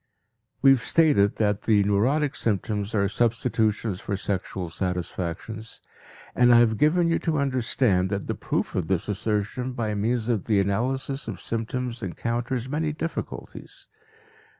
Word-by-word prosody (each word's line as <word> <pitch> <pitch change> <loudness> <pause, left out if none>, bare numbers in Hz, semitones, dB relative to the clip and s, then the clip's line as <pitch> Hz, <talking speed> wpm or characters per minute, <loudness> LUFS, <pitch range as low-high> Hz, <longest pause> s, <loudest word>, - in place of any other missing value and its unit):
We 135 - +8
have 135 -3 +4
stated 120 -6 +3
that 105 -1 0
the 105 -3 +3
neurotic 130 +9 +1
symptoms 105 0 -1
are 100 -1 +2
substitutions 110 -2 0
for 100 - -3
sexual 95 -2 -3
satisfactions, 90 +4 -4 0.5
and 125 0 +5
I 120 - +8
have 110 -2 +3
given 170 +3 +3
you 165 - +1
to 160 -2 -1
understand 125 -8 +1
that 100 -1 -2
the - - -2
proof - - -2
of 85 -4 -1
this 95 -3 0
assertion 105 +5 -2
by 110 -3 -2
means 110 +2 0
of 115 -6 0
the 105 -3 +2
analysis 130 +8 -1
of 100 -5 -5
symptoms 120 +1 -3
encounters 120 +6 -3
many 150 +2 -1
difficulties. 165 +2 -6
110 Hz, 145 wpm, -25 LUFS, 100-125 Hz, 0.5 s, We